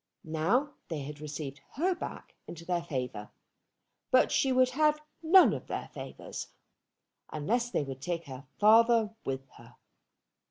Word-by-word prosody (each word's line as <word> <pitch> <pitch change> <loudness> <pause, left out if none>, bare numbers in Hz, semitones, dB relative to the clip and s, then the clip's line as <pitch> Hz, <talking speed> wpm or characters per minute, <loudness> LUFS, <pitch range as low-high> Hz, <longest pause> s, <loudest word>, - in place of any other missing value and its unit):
Now 200 - 0
they 160 -4 -4
had 145 +2 -7
received 145 -2 -6
her 360 +6 +1
back 345 - -8
into 170 0 -9
their 175 -1 0
favour. 125 -10 -4 0.8
But 255 - +4
she 270 - +2
would 255 0 +4
have 300 +2 +3 0.2
none 360 +3 +7
of - - -6
their - - -4
favours, - - -7 0.8
unless 235 +11 -1
they 195 - 0
would 135 -1 -7
take 170 0 -3
her 130 -1 -9
father 225 +1 +5
with 135 0 -3
her. - - -16
175 Hz, 145 wpm, -30 LUFS, -, 0.8 s, none